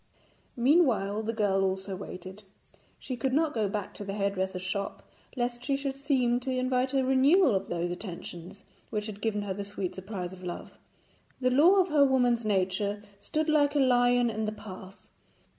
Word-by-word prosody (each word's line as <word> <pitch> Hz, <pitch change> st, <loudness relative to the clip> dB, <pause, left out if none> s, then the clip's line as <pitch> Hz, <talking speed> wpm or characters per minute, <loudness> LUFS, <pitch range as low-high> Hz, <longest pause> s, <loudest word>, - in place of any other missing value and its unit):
Meanwhile 240 Hz, -, +3 dB
the 220 Hz, +1 st, -2 dB
girl 205 Hz, -4 st, +1 dB
also 190 Hz, 0 st, -2 dB
waited. 185 Hz, +1 st, -8 dB, 0.6 s
She 255 Hz, -, -5 dB
could 255 Hz, +2 st, -1 dB
not 310 Hz, +1 st, +2 dB
go 215 Hz, -4 st, 0 dB
back 205 Hz, -1 st, -4 dB
to -, -, -8 dB
the 195 Hz, 0 st, -5 dB
hairdresser's 190 Hz, -2 st, -1 dB
shop 195 Hz, +2 st, -4 dB, 0.3 s
lest 240 Hz, 0 st, -2 dB
she 275 Hz, 0 st, 0 dB
should 275 Hz, -1 st, -3 dB
seem 260 Hz, -4 st, +1 dB
to 255 Hz, +2 st, -5 dB
invite 255 Hz, +1 st, 0 dB
a 265 Hz, -, +3 dB
renewal 265 Hz, -, +5 dB
of 195 Hz, 0 st, -1 dB
those 175 Hz, 0 st, -2 dB
attentions 175 Hz, 0 st, -8 dB, 0.3 s
which 210 Hz, -2 st, -2 dB
had 210 Hz, -1 st, -7 dB
given 210 Hz, -2 st, -1 dB
her 200 Hz, -2 st, -3 dB
the 200 Hz, +1 st, -5 dB
sweet 200 Hz, -2 st, -4 dB
surprise 190 Hz, -2 st, -6 dB
of 185 Hz, -, -12 dB
love. 175 Hz, -1 st, -6 dB, 0.7 s
The 255 Hz, -1 st, +2 dB
law 315 Hz, +9 st, +6 dB
of 375 Hz, -, +2 dB
her 300 Hz, -2 st, +5 dB
woman's 245 Hz, -3 st, +3 dB
nature 200 Hz, 0 st, 0 dB, 0.2 s
stood 310 Hz, +8 st, -2 dB
like 295 Hz, -2 st, +3 dB
a -, -, +3 dB
lion 245 Hz, -2 st, +4 dB
in 220 Hz, 0 st, -2 dB
the 215 Hz, -, -1 dB
path. 195 Hz, -2 st, -11 dB
220 Hz, 180 wpm, -29 LUFS, 195-260 Hz, 0.7 s, law